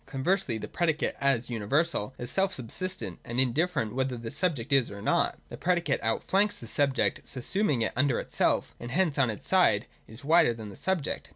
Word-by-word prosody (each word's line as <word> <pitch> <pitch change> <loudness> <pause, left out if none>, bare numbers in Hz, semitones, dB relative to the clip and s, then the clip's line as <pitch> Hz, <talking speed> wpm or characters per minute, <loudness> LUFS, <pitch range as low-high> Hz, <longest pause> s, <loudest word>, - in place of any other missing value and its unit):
Conversely, 140 - 0
the - - -6
predicate 160 -2 0
as 130 -3 +1
universal 120 +2 0
is 120 - -4
self 195 0 +1
sub 120 -4 -8
sistent, 150 - -3
and 120 +2 -3
indifferent 130 -1 +1
whether 130 -1 -1
this 115 -1 -5
subject 145 -9 0
is 135 -3 +4
or 100 - -8
not. - - +1
The - - -8
predicate 175 -5 0
outflanks 195 - +1
the - - -10
subject, 140 +2 0
subsuming 140 - 0
it - - 0
under 130 0 +2
itself: - - 0
and 120 - -7
hence 160 0 +1
on 130 -3 +3
its 105 - -6
side - - +3 0.2
is 110 +5 -13
wider 155 -6 +4
than 110 -2 -8
the 100 - -10
subject. 190 -6 -2
135 Hz, 190 wpm, -28 LUFS, 115-170 Hz, 0.2 s, is